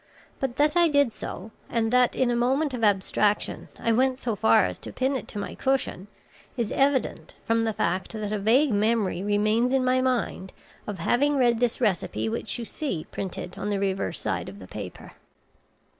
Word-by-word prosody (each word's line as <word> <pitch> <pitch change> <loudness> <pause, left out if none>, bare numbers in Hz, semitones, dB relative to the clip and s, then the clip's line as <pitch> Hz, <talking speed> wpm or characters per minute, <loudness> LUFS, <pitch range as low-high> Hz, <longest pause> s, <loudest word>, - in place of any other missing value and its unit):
But 265 -3 -2
that 300 +2 +2
I 345 -1 +6
did 285 -4 +3
do - - -15
so, 200 +5 -7 0.2
and 225 0 0
that, 250 -1 +4
in 255 -2 +2
a - - +1
moment 265 +5 +1
of 240 -2 -4
abstraction 205 0 +1
I 230 - +1
went 255 +3 +2
so 235 -4 -2
far 115 - +4
as 90 -1 -4
to - - -8
pin 265 +2 0
it 260 - -4
to - - -8
my 205 - -4
cushion, 265 -8 -1 0.5
is 235 -4 -1
evident 275 -1 0
from 230 0 +2
the 225 -1 +1
fact 185 -1 -1
that 215 -2 -4
a 210 - -1
vague 245 +8 +3
memory 210 -3 +1
remains 215 +5 +2
in 265 -1 +2
my 255 0 +3
mind 250 -7 -1 0.3
of 205 -2 -4
having 285 +7 +2
read 240 -3 +3
this 240 -1 +1
recipe 180 - 0
which 110 - -3
you 235 - -5
see 225 - -4
printed 180 -2 -5
on 205 - -2
the 200 -1 0
reverse 190 - -1
side - - -2
of 100 - -11
the 95 - -10
paper." 100 -3 -8
230 Hz, 200 wpm, -26 LUFS, 200-255 Hz, 0.5 s, I